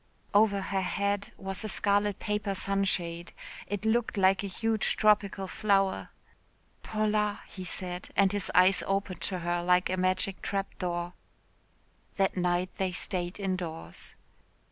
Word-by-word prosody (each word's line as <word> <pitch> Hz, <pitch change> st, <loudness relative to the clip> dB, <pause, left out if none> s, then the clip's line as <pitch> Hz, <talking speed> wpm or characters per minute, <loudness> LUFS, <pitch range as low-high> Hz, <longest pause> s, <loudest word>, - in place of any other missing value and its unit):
Over 205 Hz, -1 st, +4 dB
her 190 Hz, 0 st, -1 dB
head 200 Hz, +2 st, -1 dB
was 195 Hz, +1 st, -1 dB
a 215 Hz, -, -2 dB
scarlet 205 Hz, 0 st, +2 dB
paper 210 Hz, -2 st, -2 dB
sunshade. 180 Hz, -4 st, -1 dB, 0.3 s
It 205 Hz, +2 st, -3 dB
looked 225 Hz, 0 st, +1 dB
like 190 Hz, 0 st, +4 dB
a -, -, -2 dB
huge 220 Hz, +3 st, 0 dB
tropical 205 Hz, -2 st, +3 dB
flower. 195 Hz, -1 st, +1 dB, 0.7 s
"Paula," 210 Hz, -1 st, 0 dB
he 185 Hz, -, -8 dB
said 180 Hz, 0 st, -4 dB
and 195 Hz, -1 st, +4 dB
his 205 Hz, -3 st, -1 dB
eyes 185 Hz, +1 st, +6 dB
opened 195 Hz, -1 st, -1 dB
to 185 Hz, -, -1 dB
her 175 Hz, 0 st, 0 dB
like 180 Hz, +1 st, +3 dB
a 185 Hz, -, 0 dB
magic 185 Hz, +1 st, 0 dB
trap 195 Hz, -1 st, -3 dB
door. 175 Hz, -1 st, -2 dB, 1.0 s
That 195 Hz, -1 st, +1 dB
night 180 Hz, 0 st, 0 dB
they 190 Hz, -1 st, 0 dB
stayed 180 Hz, +1 st, -2 dB
indoors. 185 Hz, -4 st, -4 dB
195 Hz, 140 wpm, -29 LUFS, 180-205 Hz, 1.0 s, eyes